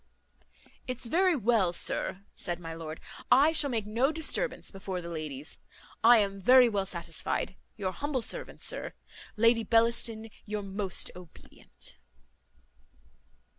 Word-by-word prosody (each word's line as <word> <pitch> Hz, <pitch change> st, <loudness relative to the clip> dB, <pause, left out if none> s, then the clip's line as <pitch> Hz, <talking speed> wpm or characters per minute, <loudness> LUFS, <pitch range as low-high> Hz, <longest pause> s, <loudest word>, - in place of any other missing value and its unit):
"It's 255 Hz, -1 st, -3 dB
very 355 Hz, +8 st, +3 dB
well, 225 Hz, -7 st, +2 dB
sir," 180 Hz, +2 st, +2 dB
said 175 Hz, -1 st, -2 dB
my 165 Hz, -1 st, -7 dB
lord, 160 Hz, -1 st, -7 dB, 0.3 s
"I 290 Hz, +4 st, +6 dB
shall 305 Hz, -3 st, +3 dB
make 225 Hz, -5 st, -1 dB
no 235 Hz, +7 st, +1 dB
disturbance 320 Hz, +10 st, -1 dB
before 190 Hz, -1 st, -5 dB
the 170 Hz, -1 st, -7 dB
ladies. 155 Hz, -2 st, -4 dB, 0.4 s
I 235 Hz, +1 st, +8 dB
am 195 Hz, -2 st, 0 dB
very 250 Hz, +4 st, +7 dB
well 200 Hz, -3 st, -1 dB
satisfied. 170 Hz, +1 st, -2 dB, 0.2 s
Your 190 Hz, -2 st, -2 dB
humble 275 Hz, +2 st, -2 dB
servant, -, -, -3 dB
sir; -, -, -3 dB, 0.4 s
Lady 230 Hz, +1 st, +4 dB
Bellaston, 225 Hz, 0 st, +1 dB
your 210 Hz, -1 st, -4 dB
most 195 Hz, -1 st, -1 dB
obedient." 180 Hz, -2 st, -12 dB
215 Hz, 130 wpm, -29 LUFS, 180-250 Hz, 0.4 s, I